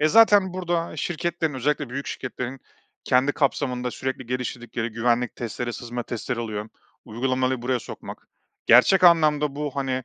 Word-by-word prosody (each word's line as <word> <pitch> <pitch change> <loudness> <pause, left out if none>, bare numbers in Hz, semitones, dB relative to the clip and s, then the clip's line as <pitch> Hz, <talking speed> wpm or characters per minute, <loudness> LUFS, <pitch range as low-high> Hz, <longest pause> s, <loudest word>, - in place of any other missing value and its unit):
E, 155 - +4
zaten 205 -1 +6
burada 175 -3 -2
şirketlerin, 165 -1 -2
özellikle 145 +2 -1
büyük 140 +2 -4
şirketlerin 130 +1 -5 0.4
kendi 130 +3 +3
kapsamında 125 -4 0
sürekli 130 0 -4
geliştirdikleri 120 -1 -3
güvenlik 120 +1 0
testleri, 120 +1 -4
sızma 120 +1 -5
testleri 120 +1 -4
oluyor. 110 -2 -4 0.4
Uygulamayo 130 +2 -1
buraya 125 0 0
sokmak, - - -10 0.4
gerçek 180 +11 +6
anlamda 150 -4 +4
bu, 150 0 -2
hani, 130 -2 -1
130 Hz, 135 wpm, -24 LUFS, 120-150 Hz, 0.4 s, zaten